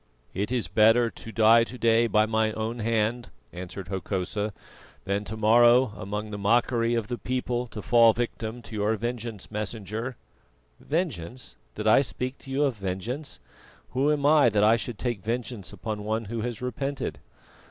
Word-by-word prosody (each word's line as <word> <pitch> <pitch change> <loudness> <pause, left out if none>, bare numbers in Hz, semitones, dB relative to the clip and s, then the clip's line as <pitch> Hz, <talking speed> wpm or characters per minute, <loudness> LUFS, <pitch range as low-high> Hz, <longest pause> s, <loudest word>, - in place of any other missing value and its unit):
"It 100 +5 -2
is 125 -3 0
better 115 +2 +4
to 115 - -10
die 115 +1 +6
to 125 +2 -7
day 115 0 +3
by 110 -1 +3
my 110 0 +1
own 110 +2 -3
hand," 115 +1 0 0.2
answered 90 +1 -7
Hokosa, 95 +2 -2 0.5
"than 100 +1 -1
to 110 +2 -5
morrow 120 +2 +5
among 105 +2 -5
the 105 - -5
mockery 115 +2 +2
of 115 -2 -1
the 120 0 -4
people 125 +1 -2
to 110 -3 -8
fall 115 -1 +6
a - - +4
victim 120 0 -4
to 110 - -9
your 105 +1 +1
vengeance, 115 -2 -5
Messenger." 110 +3 -4 0.6
"Vengeance! 130 - -3 0.2
Did 105 - -5
I 110 +5 +6
speak 130 0 -4
to 135 - -13
you 135 +2 +1
of 135 -6 0
vengeance? 100 - -4 0.5
Who 135 +4 +2
am 145 -2 0
I 145 -4 +6
that 105 -1 +2
I 110 +2 +6
should 115 -1 -5
take 120 -4 -3
vengeance 115 -1 -4
upon 105 +1 -5
one 110 +2 -2
who 115 +2 -4
has 120 0 -4
repented? 135 +2 -3
115 Hz, 175 wpm, -26 LUFS, 105-120 Hz, 0.6 s, die